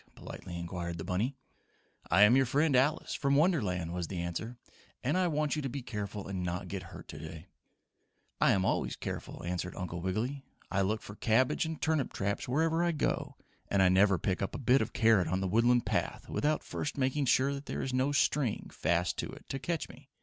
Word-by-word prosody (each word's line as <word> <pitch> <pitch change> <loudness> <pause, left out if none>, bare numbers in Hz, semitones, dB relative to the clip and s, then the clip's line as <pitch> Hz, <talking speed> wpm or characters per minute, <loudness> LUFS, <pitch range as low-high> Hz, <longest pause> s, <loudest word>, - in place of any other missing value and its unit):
politely 85 -1 -8
inquired 85 0 -4
the 80 - -5
bunny. 100 +10 -1 0.7
"I 105 - +6
am 110 +4 +7
your 135 -1 +4
friend 145 +3 +2
Alice, 135 +4 +2
from 140 -1 +1
Wonderland," 105 - +2
was 90 -2 -2
the 95 - -4
answer, 85 +8 -4 0.5
"and 140 +6 +1
I 185 -1 +3
want 150 -2 0
you 150 - -2
to 135 - -3
be 130 +1 -5
careful 105 -3 -5
and 95 -2 -3
not 90 0 -3
get - - -4
hurt - - -11
today." 80 +2 -9 0.9
"I - - +5
always 95 0 0
am - - -29
careful," - - -5
answered 90 +1 -3
Uncle 90 -2 -4
Wiggily. 115 +10 -2 0.3
"I 100 - +2
look 105 +3 0
for 105 - -8
cabbage 120 +8 +2
and 160 -1 -5
turnip 155 -4 0
traps 100 +1 -2
wherever 160 +6 +2
I 170 -1 +2
go, 150 - -1 0.3
and 100 -1 +3
I 90 - +6
never 95 +1 +5
pick 95 +1 -1
up 100 - -2
a - - -2
bit 130 +1 +3
of - - -2
carrot 110 -7 +4
on 95 +3 0
the 95 - -1
Woodland 120 +5 +3
path - - -2
without 150 +1 0
first 145 - -4
making 135 +2 +1
sure 140 +2 +2
there 140 - -4
is 130 - -3
no 130 +2 +2
string 140 -4 +1
fast 85 +1 0
to - - -2
it, - - -13
to 135 - -3
catch 165 +3 -2
me. 135 +3 -15
115 Hz, 210 wpm, -31 LUFS, 95-140 Hz, 0.9 s, am